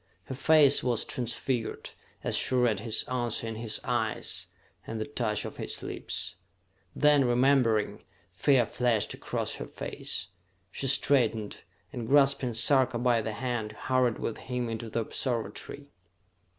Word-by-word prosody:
Her - - -7
face 145 +1 +5
was 120 -3 +1
transfigured 120 -1 -3 0.3
as - - 0
she 130 - +1
read 120 -5 +2
his 110 +1 0
answer 120 -3 -2
in 115 - -4
his 110 0 -4
eyes, - - -1 0.4
and 115 - -4
the 110 - -2
touch 110 -7 -1
of - - -7
his - - -2
lips. 85 - -3 0.6
Then, 150 -2 +5
remembering, 125 -3 +2 0.3
fear 125 +6 +3
flashed 120 -2 0
across - - -3
her - - -6
face. 90 0 -5 0.4
She 135 - -3
straightened, 115 -6 +1 0.3
and 120 -3 -5
grasping 135 -3 +4
Sarka 130 +1 +3
by 120 -1 +2
the 110 0 -4
hand, 115 -2 -3
hurried 130 -3 +1
with 115 - -4
him 125 -2 -3
into 115 0 -5
the 115 - -1
observatory. 120 +4 -3
120 Hz, 140 wpm, -29 LUFS, 110-130 Hz, 0.6 s, face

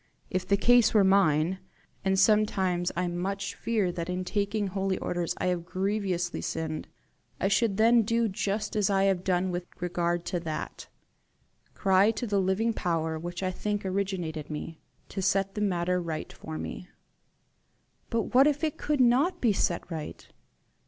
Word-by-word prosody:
If 185 0 -2
the 200 - +3
case 240 +1 +5
were 210 - +6
mine 185 -2 +3 0.4
and 190 0 +2
sometimes 190 -4 +2
I 180 +1 0
much 195 +3 -3
fear 215 -6 0
that 170 0 -5
in 180 0 -2
taking 205 +2 -1
holy 195 0 -1
orders 175 -1 -2
I - - -2
have 175 -1 -4
grievously 185 -1 -2
sinned 160 -1 -3 0.5
I 195 - +1
should 205 -1 +2
then 230 +2 +5
do 230 +1 +1
just 205 +2 -2
as 205 -2 +2
I 195 -1 +3
have 190 -2 +2
done 185 -1 +1
with 175 0 -4
regard 175 -1 -1
to 175 - -2
that 160 -2 -5 0.9
cry 195 +1 +4
to 245 - -2
the 200 -3 +1
living 195 +5 +1
power 160 -4 -1
which 175 +2 -5
I 185 - 0
think 205 +2 -3
originated 185 -6 -2
me, 155 +1 -6 0.3
to 195 - -4
set 195 +1 +1
the 210 - -4
matter 180 -2 +1
right 160 -2 -5
for 155 0 -7
me." 180 - -6 1.2
"But 245 +4 +3
if 295 +1 0
it 310 -2 -1
could 295 -3 +1
not 255 +9 +3
be 230 -4 +3
set 175 -1 -1
right?" 155 -2 -6
190 Hz, 165 wpm, -28 LUFS, 175-210 Hz, 1.2 s, were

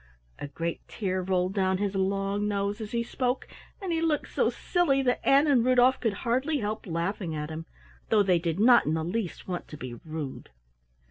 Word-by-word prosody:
A - - -5
great 165 +3 -4
tear 185 -3 -2
rolled 185 0 0
down 190 -2 +1
his 200 0 -1
long 195 +1 0
nose 200 +1 -1
as 215 - -5
he 235 -1 0
spoke, 250 +2 -2 0.3
and 375 -4 -3
he 325 - 0
looked 320 -3 0
so - - +2
silly 290 -7 +1
that 250 -1 +1
Ann 275 +2 +5
and 270 -6 +4
Rudolf 255 +1 +4
could 225 -4 0
hardly 260 +6 +1
help 215 -3 -3
laughing 170 0 -2
at 150 +1 -4
him, 160 +1 -6 0.4
though 215 -2 +5
they 180 -3 +3
did 165 +1 -2
not 235 -2 +6
in 155 - +1
the 160 - -1
least 180 +2 -3
want 180 -2 -4
to 150 - -9
be 130 -3 -6
rude. 155 +1 -7
200 Hz, 200 wpm, -28 LUFS, 175-245 Hz, 0.4 s, not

